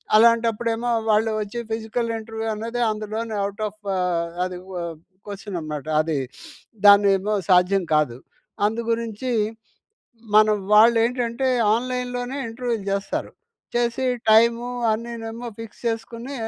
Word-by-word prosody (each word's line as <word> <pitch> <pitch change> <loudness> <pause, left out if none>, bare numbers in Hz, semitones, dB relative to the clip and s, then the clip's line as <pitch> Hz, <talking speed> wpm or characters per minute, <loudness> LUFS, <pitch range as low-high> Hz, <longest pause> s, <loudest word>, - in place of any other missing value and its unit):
అలాంటప్పుడేమో 230 +1 +3 0.2
వాళ్ళు 215 +1 +3
ఒచ్చి 210 +3 -5
physical 225 +1 -2
interview 225 0 -5
అన్నదే 230 +3 -3
అందులోనే 215 +1 -4
ఔట్ 205 +2 -6
ఆఫ్ 215 - -24 0.2
ఆహ్, 175 -2 0 0.2
అది 180 -1 -5
వ్ - - -7 0.5
క్వెషన్ 200 -2 -6
అనమాట. 150 -2 -5 0.2
అది 155 -1 -1 0.7
దాన్నేమో 200 0 +6 0.2
సాధ్యం 180 +1 +4
కాదు. 135 -6 +1 0.5
అందుగురించి 230 +2 -2 1.0
మనం 215 0 +6 0.2
వాళ్ళు 230 +2 +7
ఏంటంటే 245 +1 -1 0.3
ఆన్‍లైన్‍లోనే 250 +1 -3
ఇంటర్వ్యూలు 230 -3 -3
చేస్తారు. 195 0 -2 0.4
చేసి 240 +2 0 0.3
టైము 230 +2 +5 0.3
అన్నినేమో 230 +1 -5
ఫిక్స్ 225 -2 -10
చేసుకొని 230 +3 -4
225 Hz, 110 wpm, -23 LUFS, 205-235 Hz, 1.0 s, వాళ్ళు